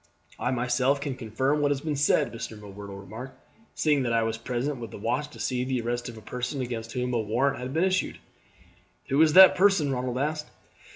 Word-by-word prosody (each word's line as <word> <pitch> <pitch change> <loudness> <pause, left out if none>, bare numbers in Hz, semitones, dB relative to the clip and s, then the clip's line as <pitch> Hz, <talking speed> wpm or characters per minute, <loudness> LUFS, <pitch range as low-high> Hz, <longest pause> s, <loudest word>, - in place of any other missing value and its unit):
"I 125 - 0
myself 125 +2 +1
can 140 -1 -3
confirm 130 +5 -1
what 145 - +2
has 140 -1 0
been 155 -1 -2
said," 145 -3 +2
Mr. 115 -1 -6
M'Whirtle 100 -1 -9
remarked, 110 +7 -9 0.4
"seeing 150 -3 +2
that 120 -2 0
I 115 0 +3
was 115 0 -1
present 125 +4 -3
with 115 -2 -6
the - - -9
watch 130 +8 -1
to 145 - -14
see 125 -1 -1
the 130 0 -1
arrest 120 +1 -3
of 115 - -10
a - - -10
person 125 +5 -4
against 115 -3 -4
whom 125 0 -2
a 120 - +1
warrant 115 +6 0
had 125 +1 -5
been 160 +5 +1
issued." 185 0 0 0.9
"Who 140 +3 +3
is 155 -1 +5
that 190 +2 +10
person?" 185 -7 +3
Ronald 125 -1 -2
asked. 150 +2 -2
125 Hz, 215 wpm, -27 LUFS, 115-145 Hz, 0.9 s, that